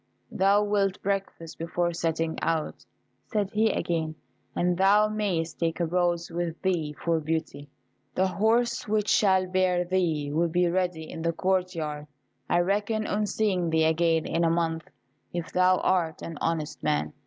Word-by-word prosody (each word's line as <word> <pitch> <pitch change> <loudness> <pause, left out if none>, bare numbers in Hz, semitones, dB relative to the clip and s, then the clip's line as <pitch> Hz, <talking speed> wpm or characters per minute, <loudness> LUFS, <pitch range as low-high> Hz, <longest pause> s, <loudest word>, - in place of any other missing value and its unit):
"Thou 200 +2 +3
wilt 200 -2 0
breakfast 195 -4 -3
before 170 +1 -1
setting 165 -1 -1
out," 160 -2 -2 0.4
said 205 -3 -1
he 220 +1 +2
again; 160 -5 -2 0.4
"and 175 0 +1
thou 200 +3 +4
mayest 190 -7 -2
take 165 0 -1
a 170 - +1
rose 175 0 0
with 170 -1 -3
thee 165 -6 0
for 165 -1 +2
Beauty. 155 -2 -3 0.5
The 185 - +3
horse 225 +7 +1
which 210 0 0
shall 190 -2 +3
bear 185 -1 +1
thee 165 -6 0
will 170 +2 +1
be 175 +2 +2
ready 175 -2 -1
in 160 - -7
the 170 0 0
court 185 0 0
yard. 150 -2 -4 0.4
I 175 - +3
reckon 205 +4 0
on 210 0 0
seeing 190 -6 0
thee 160 0 +2
again 160 0 +2
in 170 - 0
a 165 - +3
month, 165 -1 -1 0.4
if 175 -2 -4
thou 185 0 +4
art 170 -4 0
an 165 -3 -7
honest 160 -2 -2
man. 75 +1 0
175 Hz, 165 wpm, -27 LUFS, 165-190 Hz, 0.5 s, thou